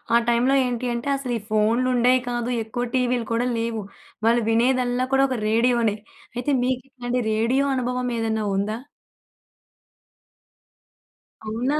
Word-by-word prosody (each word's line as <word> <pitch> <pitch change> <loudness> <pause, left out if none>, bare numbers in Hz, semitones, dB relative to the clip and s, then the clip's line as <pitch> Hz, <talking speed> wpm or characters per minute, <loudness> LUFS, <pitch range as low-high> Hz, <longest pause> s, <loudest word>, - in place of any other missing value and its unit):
ఆ - - +8
టైమ్‌లో 240 +3 +3
ఏంటి 245 0 -2
అంటే 235 +4 -3
అసలు 255 -3 -4
ఈ - - -5
ఫోన్‌లు 220 +4 +2
ఉండేయి 250 +1 +4
కాదు. 240 0 -2
ఎక్కువ 230 +2 -4
టీవీలు 245 -2 0
కూడా 235 +2 +1
లేవు. 230 -1 -2 0.5
వాళ్ళు 235 0 +3
వినేదల్లా 250 +1 +2
కూడా 270 0 +5
ఒక 255 - -1
రేడియోనే. 230 -2 +2 0.4
అయితే 250 +4 -1
మీకిలాంటి 250 -1 -2
రేడియో 240 +6 +2
అనుభవం 250 0 -1
ఏదైనా 220 -1 -1
ఉందా? 210 +3 -1 2.7
అవునా? 250 +7 0
245 Hz, 125 wpm, -23 LUFS, 230-255 Hz, 2.7 s, ఆ